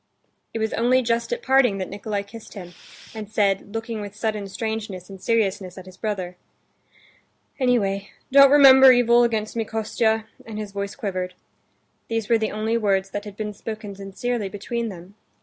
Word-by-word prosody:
It -, -, -4 dB
was 220 Hz, -1 st, -1 dB
only 255 Hz, +2 st, +3 dB
just 235 Hz, -, -1 dB
at 485 Hz, 0 st, -3 dB
parting 260 Hz, -6 st, +4 dB
that 185 Hz, -, -3 dB
Nikolay 205 Hz, 0 st, -4 dB
kissed 210 Hz, +3 st, -12 dB
him, 180 Hz, -3 st, -9 dB, 0.4 s
and 215 Hz, -2 st, -7 dB
said, 200 Hz, -1 st, +1 dB
looking 225 Hz, -1 st, -4 dB
with 205 Hz, 0 st, -8 dB
sudden 215 Hz, -2 st, -2 dB
strangeness 210 Hz, -3 st, -5 dB
and 190 Hz, -1 st, -11 dB
seriousness 195 Hz, -5 st, 0 dB
at 185 Hz, -, -9 dB
his 185 Hz, -1 st, -13 dB
brother: 185 Hz, -5 st, -4 dB, 1.2 s
"Anyway, 205 Hz, -6 st, +1 dB, 0.2 s
don't 275 Hz, 0 st, +8 dB
remember 265 Hz, -2 st, +9 dB
evil 240 Hz, -1 st, +5 dB
against 220 Hz, -2 st, -1 dB
me, 230 Hz, -, 0 dB
Kostya!" 220 Hz, 0 st, 0 dB, 0.2 s
and 220 Hz, -2 st, -8 dB
his 210 Hz, -2 st, -5 dB
voice 200 Hz, 0 st, -4 dB
quivered. 185 Hz, -3 st, -4 dB, 0.7 s
These 225 Hz, -2 st, -2 dB
were 230 Hz, -1 st, +4 dB
the 220 Hz, -, -1 dB
only 220 Hz, +2 st, 0 dB
words 195 Hz, -3 st, 0 dB
that 205 Hz, +1 st, -4 dB
had 205 Hz, -1 st, -9 dB
been 210 Hz, -1 st, -4 dB
spoken 215 Hz, 0 st, -7 dB
sincerely 200 Hz, +3 st, -3 dB
between 230 Hz, +3 st, -4 dB
them. 180 Hz, 0 st, -11 dB
215 Hz, 170 wpm, -23 LUFS, 195-230 Hz, 1.2 s, remember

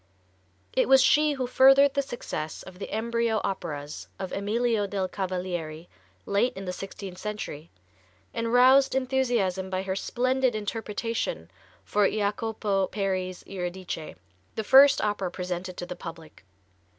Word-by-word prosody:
It -, -, +2 dB
was 265 Hz, -1 st, +7 dB
she 300 Hz, +1 st, +4 dB
who 265 Hz, -2 st, -2 dB
furthered 270 Hz, +2 st, +6 dB
the 280 Hz, -, +2 dB
success 160 Hz, -, -5 dB
of 185 Hz, -1 st, -12 dB
the -, -, -6 dB
embryo 230 Hz, 0 st, 0 dB
operas 150 Hz, -6 st, -4 dB
of 190 Hz, -, -5 dB
Emilio 215 Hz, +1 st, 0 dB
del 195 Hz, -1 st, -2 dB
Cavalieri, 180 Hz, -4 st, -4 dB, 0.4 s
late 230 Hz, +6 st, +1 dB
in 195 Hz, -, -6 dB
the 180 Hz, -, -3 dB
sixteenth 190 Hz, -1 st, -8 dB
century, 205 Hz, -7 st, -6 dB, 0.6 s
and 230 Hz, 0 st, -2 dB
roused 260 Hz, +3 st, +6 dB
enthusiasm 240 Hz, -8 st, 0 dB
by 185 Hz, 0 st, -2 dB
her 190 Hz, -1 st, -2 dB
splendid 255 Hz, +3 st, 0 dB
interpretation 225 Hz, -, -3 dB, 0.3 s
for 205 Hz, -1 st, +2 dB
Jacopo 210 Hz, -2 st, -1 dB
Peri's 185 Hz, -2 st, -2 dB
"Eurydice," 180 Hz, -3 st, -5 dB, 0.4 s
the 220 Hz, -, -2 dB
first 275 Hz, +5 st, +7 dB
opera 205 Hz, -3 st, -1 dB
presented 180 Hz, 0 st, -5 dB
to 175 Hz, -, -4 dB
the 180 Hz, 0 st, -6 dB
public. 165 Hz, -, -10 dB
205 Hz, 135 wpm, -27 LUFS, 185-240 Hz, 0.6 s, was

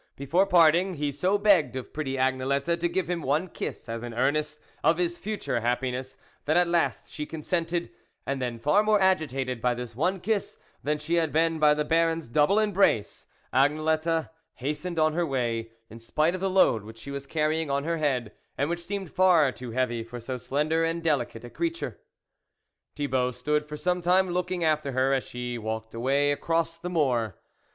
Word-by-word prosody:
Before 170 Hz, +8 st, +1 dB
parting, 175 Hz, +1 st, +4 dB
he 145 Hz, -1 st, -1 dB
so 185 Hz, +8 st, +1 dB
begged 200 Hz, -9 st, +3 dB
of 130 Hz, -, -6 dB
pretty 140 Hz, -3 st, -3 dB
Agnelette 135 Hz, +5 st, 0 dB
to 175 Hz, +1 st, 0 dB
give 185 Hz, -1 st, -1 dB
him 175 Hz, -1 st, -2 dB
one 150 Hz, +6 st, 0 dB
kiss -, -, -6 dB
as 115 Hz, 0 st, -4 dB
an 120 Hz, -1 st, -6 dB
earnest 150 Hz, +4 st, 0 dB, 0.2 s
of 160 Hz, +2 st, +4 dB
his 175 Hz, -1 st, 0 dB
future 205 Hz, -, -2 dB
happi 125 Hz, +2 st, 0 dB
ness, 130 Hz, +1 st, -6 dB, 0.3 s
that 155 Hz, +3 st, +2 dB
at 175 Hz, 0 st, +4 dB
last 170 Hz, 0 st, 0 dB
she 150 Hz, -1 st, -4 dB
consented, 170 Hz, +2 st, -2 dB, 0.3 s
and 140 Hz, -1 st, -2 dB
then, 120 Hz, -2 st, -2 dB
far 150 Hz, -, +3 dB
more 215 Hz, -1 st, +3 dB
agitated 135 Hz, -, +1 dB
by 125 Hz, 0 st, +1 dB
this 120 Hz, -2 st, -7 dB
one 180 Hz, +8 st, 0 dB
kiss 205 Hz, +2 st, -2 dB, 0.2 s
than 150 Hz, +1 st, 0 dB
she 160 Hz, +3 st, -1 dB
had 160 Hz, -2 st, +1 dB
been 165 Hz, 0 st, +2 dB
by 150 Hz, -1 st, +5 dB
the 150 Hz, 0 st, -1 dB
Baron's 165 Hz, 0 st, +1 dB
double 150 Hz, -, +3 dB
embrace, 200 Hz, -, +1 dB, 0.3 s
Agnelette 155 Hz, +4 st, +1 dB, 0.2 s
hastened 150 Hz, +6 st, -4 dB
on 155 Hz, -1 st, +3 dB
her 175 Hz, +2 st, +1 dB
way, 120 Hz, -6 st, -1 dB, 0.2 s
in 115 Hz, +1 st, -12 dB
spite 155 Hz, +8 st, +1 dB
of 185 Hz, -, -4 dB
the 195 Hz, -, +1 dB
load 185 Hz, -, +4 dB
which 110 Hz, +2 st, -11 dB
she 140 Hz, +5 st, -9 dB
was 140 Hz, 0 st, -6 dB
carry 155 Hz, +2 st, 0 dB
ing 160 Hz, -, -4 dB
on 140 Hz, 0 st, 0 dB
her 165 Hz, +2 st, -1 dB
head, 130 Hz, -8 st, 0 dB, 0.3 s
and 145 Hz, +4 st, 0 dB
which 170 Hz, 0 st, -3 dB
seemed 195 Hz, -1 st, -5 dB
far 175 Hz, -7 st, +4 dB
too 125 Hz, -1 st, -8 dB
heavy 120 Hz, -1 st, -1 dB
for 120 Hz, +2 st, -8 dB
so 125 Hz, +3 st, -5 dB
slender 150 Hz, +6 st, 0 dB
and 165 Hz, 0 st, -1 dB
delicate 135 Hz, -7 st, -1 dB
a 120 Hz, -, -8 dB
creature. 335 Hz, 0 st, -3 dB, 1.0 s
Thibault 130 Hz, -3 st, 0 dB
stood 150 Hz, +5 st, -1 dB
for 150 Hz, 0 st, -7 dB
some 180 Hz, +2 st, 0 dB
time 180 Hz, +1 st, +3 dB
looking 180 Hz, 0 st, -1 dB
after 155 Hz, -3 st, +1 dB
her 130 Hz, +2 st, +2 dB
as 135 Hz, -, 0 dB
she 125 Hz, -1 st, -5 dB
walked 110 Hz, 0 st, -5 dB
away 135 Hz, +5 st, +2 dB
across 165 Hz, +2 st, -1 dB
the 180 Hz, -, -5 dB
moor. 125 Hz, -, +1 dB
150 Hz, 195 wpm, -27 LUFS, 130-170 Hz, 1.0 s, by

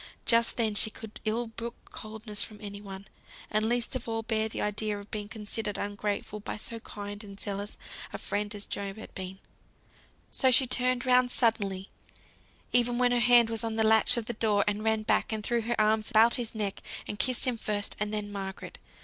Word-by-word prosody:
Just 230 Hz, 0 st, +4 dB
then 225 Hz, -3 st, +2 dB
she 215 Hz, +1 st, +5 dB
could 220 Hz, 0 st, -10 dB
ill 225 Hz, +3 st, 0 dB
brook 235 Hz, +1 st, -6 dB, 0.2 s
coldness 215 Hz, -1 st, -3 dB
from 215 Hz, -, -8 dB
any 205 Hz, -1 st, -7 dB
one, 195 Hz, -1 st, -9 dB, 0.5 s
and 215 Hz, +1 st, +1 dB
least 240 Hz, +2 st, 0 dB
of 240 Hz, -2 st, -4 dB
all 225 Hz, 0 st, -2 dB
bear 220 Hz, -1 st, 0 dB
the -, -, -5 dB
idea 210 Hz, 0 st, 0 dB
of 205 Hz, 0 st, -11 dB
being 210 Hz, -1 st, -4 dB
considered 210 Hz, -1 st, -3 dB
ungrateful 205 Hz, +1 st, -3 dB
by 205 Hz, -, -5 dB
so 230 Hz, +2 st, -5 dB
kind 205 Hz, -1 st, -7 dB
and 200 Hz, -1 st, -11 dB
zealous 205 Hz, 0 st, -3 dB, 0.3 s
a -, -, -4 dB
friend 205 Hz, +1 st, -3 dB
as 205 Hz, -, -2 dB
Job 200 Hz, 0 st, -4 dB
had 220 Hz, -, -10 dB
been; 190 Hz, 0 st, -6 dB, 0.9 s
so 260 Hz, -, +3 dB
she 255 Hz, +1 st, +7 dB
turned 250 Hz, 0 st, +1 dB
round 250 Hz, 0 st, +4 dB
suddenly, 200 Hz, -6 st, +1 dB, 0.8 s
even 245 Hz, 0 st, +5 dB
when 250 Hz, 0 st, +3 dB
her 245 Hz, -, +3 dB
hand 240 Hz, -1 st, +6 dB
was 225 Hz, 0 st, 0 dB
on 225 Hz, -1 st, -2 dB
the 220 Hz, -, +3 dB
latch 220 Hz, +2 st, +5 dB
of 235 Hz, -, -1 dB
the 240 Hz, -, -3 dB
door, 210 Hz, -3 st, +2 dB
and 210 Hz, +1 st, 0 dB
ran 220 Hz, -1 st, +2 dB
back, 215 Hz, -, +1 dB
and 215 Hz, -1 st, -2 dB
threw 235 Hz, +2 st, +1 dB
her 235 Hz, +1 st, -2 dB
arms 215 Hz, 0 st, +2 dB
about 225 Hz, +2 st, +5 dB
his 235 Hz, -2 st, -3 dB
neck, 205 Hz, -3 st, -2 dB, 0.3 s
and 210 Hz, -, -5 dB
kissed 255 Hz, 0 st, +3 dB
him 250 Hz, -2 st, +1 dB
first, 210 Hz, -2 st, -2 dB
and 210 Hz, 0 st, -1 dB
then 210 Hz, -1 st, -2 dB
Margaret. 195 Hz, -1 st, -6 dB
220 Hz, 205 wpm, -29 LUFS, 205-235 Hz, 0.9 s, she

